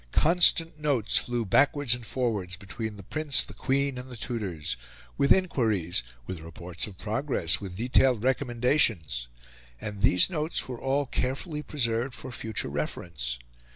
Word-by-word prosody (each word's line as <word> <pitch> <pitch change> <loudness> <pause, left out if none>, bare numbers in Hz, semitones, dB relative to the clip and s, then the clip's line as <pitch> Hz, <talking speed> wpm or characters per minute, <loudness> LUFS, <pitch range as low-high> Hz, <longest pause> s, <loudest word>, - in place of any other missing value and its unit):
Constant 165 -1 +4
notes 140 -8 +2
flew 120 -2 0
backwards 140 - +3
and 120 -2 -5
forwards 105 -7 -1
between 100 +3 -6
the 100 - -10
Prince, 155 +6 +3
the - - -10
Queen, 135 -1 -1
and 125 +1 -9
the 125 - -9
tutors, 95 - -3 0.4
with 140 - +2
inquiries, 110 - +2 0.2
with 90 +3 -6
reports 85 +3 -4
of 95 -3 -11
progress, 105 - +1
with 95 -2 -7
detailed 125 0 +3
recommendations; 120 - +1 0.5
and 105 -2 -6
these 90 -5 +6
notes 160 -3 -1
were 125 -2 -7
all 140 +2 +1
carefully 140 +5 -2
preserved 120 -4 -1
for 130 - -8
future 110 -2 -3
reference. 70 -3 -4
120 Hz, 145 wpm, -27 LUFS, 95-140 Hz, 0.5 s, these